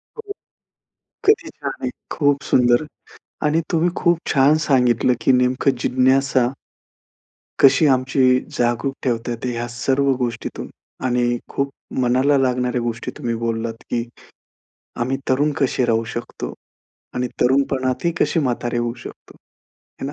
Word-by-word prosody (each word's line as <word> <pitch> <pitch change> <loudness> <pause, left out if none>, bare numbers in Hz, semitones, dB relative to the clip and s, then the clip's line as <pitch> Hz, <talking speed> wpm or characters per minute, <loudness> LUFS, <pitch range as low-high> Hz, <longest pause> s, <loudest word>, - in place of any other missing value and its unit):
हो, 450 - -7
हो. 405 - -5 0.9
किती 390 -6 +3
छान 140 - -5
आहे. 130 - -1 0.2
खूप 145 -2 +2
सुंदर 120 +3 +3 0.6
आणि 155 +2 +2
तुम्ही 170 +2 +2
खूप 170 -2 +2
छान 140 +2 +5
सांगितलं. 125 -2 +3
की 130 - +3
नेमकं 125 +2 +2
जिज्ञासा 130 0 +3 1.1
कशी 160 - +6
आमची 130 -1 +3 0.2
जागरूक 120 +3 0
ठेवता 120 -2 -1
येते, 125 +2 -3
ह्या 120 0 -3
सर्व 135 +3 0
गोष्टीतून. 120 -2 -4 0.4
आणि 120 -1 +1
खूप 140 0 -1 0.3
मनाला 130 +3 +3
लागणाऱ्या 125 -1 0
गोष्टी 115 -1 -4
तुम्ही 115 -1 -2
बोललात, 115 0 -2 0.2
की 120 -1 0 1.0
आम्ही 130 +3 0
तरुण 145 +3 +2
कसे 130 -2 +1
राहू 115 -1 +1
शकतो. 120 0 -6 0.6
आणि 125 0 -1
तरुणपणातही 135 +4 +1
कशी 165 - +2
म्हातारे 120 -3 -1
होऊ 120 0 -1
शकतो? - - -12 0.7
है 135 - -3
ना? 145 - -5
130 Hz, 130 wpm, -21 LUFS, 120-140 Hz, 1.1 s, कशी